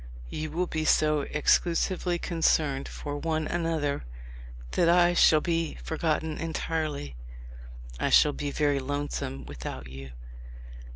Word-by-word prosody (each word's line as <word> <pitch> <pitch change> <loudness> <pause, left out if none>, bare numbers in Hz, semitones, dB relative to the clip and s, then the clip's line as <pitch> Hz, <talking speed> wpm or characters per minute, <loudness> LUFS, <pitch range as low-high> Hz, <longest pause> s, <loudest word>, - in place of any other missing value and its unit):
You 155 0 -4
will 175 +4 -1
be 160 -2 -2
so 150 -1 +3
exclusively 175 +3 +1
concerned 155 -5 +1
for 145 -1 -5
one 160 0 -1
another 160 -4 -1 0.7
that 170 - +3
I 175 0 +5
shall 155 -3 +5
be 165 -1 -1
forgotten 160 0 -2
entirely... 155 - -3 0.8
I - - +1
shall 150 - +6
be 145 0 -3
very 145 -1 +1
lonesome 140 - -4
without 65 -1 -7
you. 65 0 -9
155 Hz, 120 wpm, -28 LUFS, 145-165 Hz, 0.8 s, shall